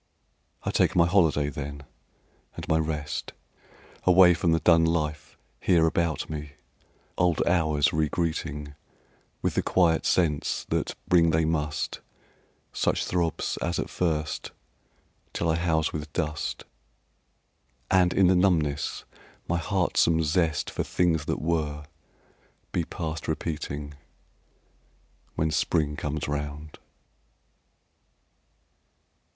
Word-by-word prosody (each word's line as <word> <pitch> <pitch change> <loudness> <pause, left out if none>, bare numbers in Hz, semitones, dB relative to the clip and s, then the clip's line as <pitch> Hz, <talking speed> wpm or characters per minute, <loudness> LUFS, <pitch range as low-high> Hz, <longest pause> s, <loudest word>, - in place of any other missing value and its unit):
I - - -1
take - - +2
my 85 - +5
holiday 80 -5 +3
then 70 0 -6 0.7
and - - -7
my 80 - +2
rest 75 -2 -3 0.7
Away 90 -1 +7
from 85 0 +1
the 80 - +3
dun 85 -1 +5
life 75 -2 -1 0.2
here 85 -3 +3
about 80 -1 0
me, 75 -2 -6 0.7
Old 90 -3 +2
hours 80 -4 +2
re 80 -1 +1
greeting 75 -3 -3 0.7
With - - +1
the - - +1
quiet 85 -3 +2
sense 80 -5 +1
that - - -1
bring 85 -2 +5
they 80 0 +2
must 75 -2 -2 0.7
Such - - 0
throbs 85 -3 -1
as 85 0 -2
at - - -3
first, 75 -4 -1 0.8
till 85 - -1
I 80 - +2
house 80 -2 0
with 75 0 -5
dust, 75 -3 -3 1.3
And 90 -2 +4
in 95 - +4
the 90 - +5
numbness 80 -6 +1 0.4
my 85 - 0
heartsome 85 -2 +2
zest 80 -1 0
For - - -2
things 80 -4 +1
that - - -2
were, 75 -3 -1 0.9
be 85 - -1
past 80 -2 -5
repeating 75 -2 -4 1.4
When 80 0 0
spring 75 -1 +1
comes 75 +1 -3
round. 75 +1 -5
80 Hz, 115 wpm, -26 LUFS, 75-85 Hz, 1.4 s, Away